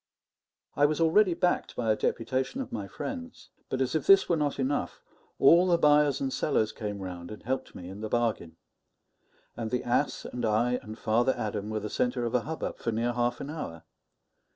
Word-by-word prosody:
I 145 +1 +5
was 155 +1 -2
already 170 +3 +4
backed 180 0 0
by 115 -2 +1
a - - +3
deputation 130 - -1
of 265 - -5
my 105 -3 -4
friends; 250 - -7 0.2
but 130 - -2
as 130 0 0
if 155 -3 -1
this 195 -1 +7
were 170 - +2
not 150 -3 -1
enough, 135 -9 -1 0.4
all 170 +6 +6
the 175 -2 +4
buyers 150 -3 +4
and 135 -1 -2
sellers 110 -7 +1
came 105 -2 -5
round 90 -2 -7
and 105 - -9
helped 130 +3 -3
me 90 - -8
in 95 +3 -8
the 110 - -4
bargain; 115 -9 -1 1.0
and 115 -2 -4
the 125 +1 -1
ass 120 - 0
and 125 - -5
I 115 +3 +2
and 110 +1 -9
Father 120 +4 +2
Adam 105 -1 -3
were 110 0 -2
the 105 - -3
centre 125 +2 -1
of 115 - -3
a 125 - +3
hubbub 160 +6 -5
for 115 - -2
near 115 +2 0
half 120 0 0
an 140 - -5
hour. 85 - -6
120 Hz, 200 wpm, -28 LUFS, 110-150 Hz, 1.0 s, this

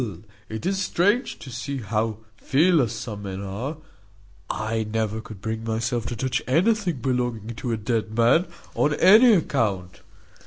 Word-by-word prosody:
it 110 +6 -5
is 195 +1 0
strange 205 +7 +1
to 130 - -10
see 135 +4 -4
how 110 -1 -1 0.2
fearless 140 - +3
some 105 -4 -6
men 95 -1 -5
are: 105 +10 -5 0.7
I 110 +1 -1
never 110 0 -1
could 110 -3 -11
bring 110 +1 -3
myself 115 +1 -1
to 120 - -3
touch 125 +2 -1
anything 175 - +1
belonging 120 -4 -1
to 120 - -3
a 115 - 0
dead 110 0 -2
man, 120 +10 +4 0.3
on 150 0 +1
any 220 +8 +7
account. 105 - -1
120 Hz, 150 wpm, -24 LUFS, 110-150 Hz, 0.7 s, any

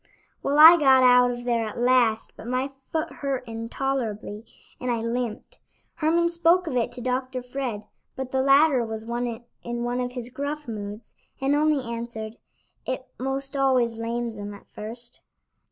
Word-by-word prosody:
Well, 285 +1 0
I 325 +3 +11
got 265 -3 +6
out 250 0 +6
of 240 0 -4
there 235 -2 +1
at - - -10
last, 240 -2 +2
but - - -10
my 255 +2 -1 0.2
foot 320 0 -1
hurt 265 -2 -3
intolerably, 230 -2 -3 0.4
and 250 - -3
I 240 - +2
limped. 230 - -4 0.3
Herman 335 +1 +2
spoke 340 +1 +3
of 310 - -3
it 240 0 +1
to 245 - -7
Dr. 255 +1 -2
Fred, 245 -4 -4 0.3
but 260 -1 -5
the 265 - +1
latter 275 -1 +5
was 220 -1 -5
in 240 0 -5
one 245 +1 -1
of 250 0 -3
his 245 -1 -6
gruff 290 +2 -4
moods, 210 0 -7 0.3
and 270 +1 +1
only 300 -2 +2
answered: 230 -2 -6 0.5
"It 260 0 -4
'most 270 +2 -2
always 255 -4 +2
lames 230 -1 -3
'em 205 0 -6
at 200 - -15
first." 235 +3 -7
250 Hz, 165 wpm, -25 LUFS, 230-270 Hz, 0.5 s, I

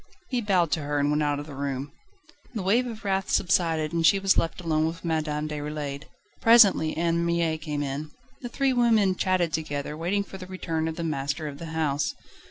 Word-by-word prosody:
He 250 -2 0
bowed 185 -7 +2
to 155 - 0
her 145 0 -2
and 145 0 +2
went 150 +1 +1
out 145 -1 0
of 145 - -6
the 150 - -10
room. 140 0 -4 0.6
The 210 - -2
wave 235 +7 +2
of 225 -3 -8
wrath 195 -1 0
subsided, 165 -4 +1
and 165 -1 0
she 195 - +6
was 195 0 +3
left 165 - 0
alone 160 -2 +1
with 165 +2 -6
Madame 155 -2 -1
Déroulède: 150 -1 -5 0.4
presently 205 -9 +6
Anne 170 0 +1
Mie 170 -1 +1
came 150 -2 -3
in. 145 +2 -4 0.3
The 245 - -5
three 270 +2 +1
women 225 -6 +3
chatted 180 -4 +1
together, 150 -2 -3
waiting 180 +6 -1
for 195 -1 -10
the 185 - -8
return 165 -4 -3
of 160 - -3
the 170 - -4
master 150 0 -2
of 145 -1 -8
the 165 - -7
house. 150 -2 0
160 Hz, 205 wpm, -26 LUFS, 150-190 Hz, 0.6 s, she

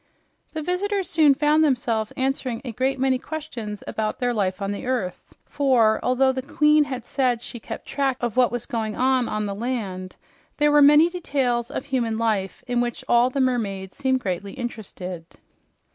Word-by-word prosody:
The 315 -1 -4
visitors 385 +3 -1
soon 305 -4 +4
found 300 +2 +3
themselves 235 -6 0
answering 260 -2 -2
a 245 - -3
great 260 +4 0
many 260 -1 +1
questions 250 -10 -6
about 215 -1 -2
their 245 -1 0
life 190 -4 -1
on 200 0 -2
the 205 +4 -5
earth, 225 -9 -2 0.2
for 245 -6 +3
although 265 +1 +3
the 260 0 -3
queen 300 +2 +3
had 255 -4 -5
said 255 -3 +1
she 240 0 -8
kept - - -8
track 270 -2 -1
of 240 -2 -2
what 255 -1 +4
was 245 -2 -3
going 220 -5 -3
on 255 -1 +2
on 215 0 -2
the 200 - -3
land, 200 -5 -4 0.4
there 295 0 +3
were 295 0 +6
many 295 +3 +7
details 270 -9 -1
of - - -5
human 235 -5 -1
life 215 -4 -1
in 245 -1 0
which 240 -1 -3
all 240 +1 +4
the 275 - -3
mermaids 205 -8 -1
seemed 260 -2 0
greatly 195 0 -3
interested. 190 -7 -6
250 Hz, 180 wpm, -23 LUFS, 220-275 Hz, 0.4 s, many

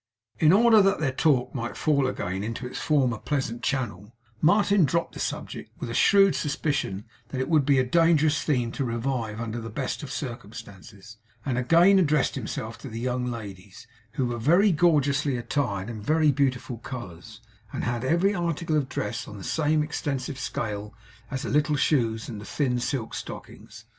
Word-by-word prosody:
In 155 0 +5
order 220 +2 +6
that 195 0 +2
their 150 -4 0
talk 130 -2 +1
might 120 -3 -4
fall 140 -3 +2
again 95 -6 -3
into 115 +3 -4
its 125 - -6
former 130 -7 +1
pleasant 130 -5 -2
channel, 120 -5 -3 0.3
Martin 200 +3 +4
dropped 170 +4 0
the - - -9
subject, - - -4
with - - -5
a - - -4
shrewd 195 -2 +5
suspicion 140 - -2 0.2
that 130 +3 -5
it 130 - -1
would 155 -5 +3
be 140 -2 +4
a 130 - +4
dangerous 155 +2 +3
theme 125 -6 0
to 135 - -3
revive 115 -2 -2
under 115 0 -4
the 115 - -6
best 130 +4 -3
of 145 -3 -7
circumstances; 115 - -8 0.3
and 130 -4 -1
again 170 +9 +5
addressed 150 -5 +2
himself 115 -2 -5
to 135 - -8
the 115 0 -6
young 125 +1 -1
ladies, 105 -1 -8 0.3
who 130 - 0
were 120 -1 -3
very 175 - +4
gorgeously 145 -5 +2
attired 120 -6 -2
in 115 -3 -6
very 155 +6 +3
beautiful 130 -3 -1
colours, 110 -5 -9 0.3
and - - -4
had 120 0 -2
every 175 +9 +2
article 170 -3 -1
of 135 -3 -1
dress 105 +2 -3
on 105 - -9
the 95 - -9
same 155 - +1
extensive 140 -3 -3
scale 105 -4 -4 0.3
as 135 -2 -4
the - - -3
little 150 +1 +2
shoes 115 -6 +1
and 110 -4 -7
the - - -9
thin 125 -3 -1
silk 120 -2 -3
stockings. - - -9
130 Hz, 180 wpm, -26 LUFS, 115-150 Hz, 0.3 s, order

